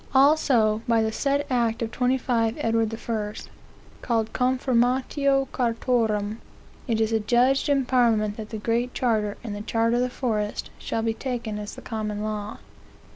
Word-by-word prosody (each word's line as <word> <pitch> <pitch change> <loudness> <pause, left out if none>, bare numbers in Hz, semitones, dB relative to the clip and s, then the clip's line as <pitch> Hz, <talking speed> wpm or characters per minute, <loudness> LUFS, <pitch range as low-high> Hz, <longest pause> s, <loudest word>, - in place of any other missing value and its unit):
"Also, 265 -6 +4
by 230 -1 +3
the 220 - 0
said 280 +5 0
act 235 -3 0
of 225 - -4
25 245 -3 +1
Edward 225 -5 +1 0.2
I., 215 -2 -2 0.7
(called 225 -2 -1
Confirmatio 260 +2 +1
Chartarum,) 225 -3 0 0.5
it 225 -3 0
is 220 0 +1
adjudged 245 +6 +2
in 275 -2 +2
parliament 225 -5 +2
that 215 -1 -7
the 220 - -5
Great 235 +3 -1
Charter 215 -4 0
and 220 -4 -5
the 205 - -5
Charter 230 +2 +1
of - - +2
the 250 - 0
Forest 215 -5 -2
shall 225 - -2
be 225 0 +1
taken 235 -4 -4
as 210 0 -7
the - - -11
common 215 -2 -3
law. 215 0 -4
230 Hz, 155 wpm, -25 LUFS, 220-250 Hz, 0.7 s, Also